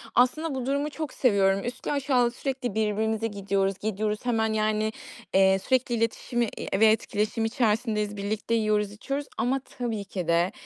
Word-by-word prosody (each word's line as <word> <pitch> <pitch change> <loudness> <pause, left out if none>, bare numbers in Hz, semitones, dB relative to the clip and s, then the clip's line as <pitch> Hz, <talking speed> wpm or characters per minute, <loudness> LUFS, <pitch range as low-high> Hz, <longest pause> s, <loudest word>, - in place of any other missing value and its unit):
aslında 280 +5 +2
bu 255 -2 -3
durumu 280 +3 0
çok 310 -2 -5
seviyorum. 195 -5 +3
Üstlü 245 +1 -4
aşağılı 260 -4 +2
sürekli 255 -4 -3
birbirimize 220 +1 0
gidiyoruz, 195 -2 -1
gidiyoruz 215 +1 -2
hemen, 220 -2 +1
yani, 215 0 +1 0.4
eee, 190 0 +5
sürekli 250 +3 +1
iletişimi, 230 +1 0
iii, - - -5
ve 220 - +7
etkileşim 215 0 +1
içerisindeyiz, 215 -2 0
birlikte 210 +3 -2
yiyoruz, 210 -2 +1
içiyoruz 275 +7 -4
ama 265 +3 +1 0.2
tabii 225 -4 -2
ki 185 -3 -5
de, 170 +2 +3
220 Hz, 150 wpm, -27 LUFS, 205-245 Hz, 0.4 s, ve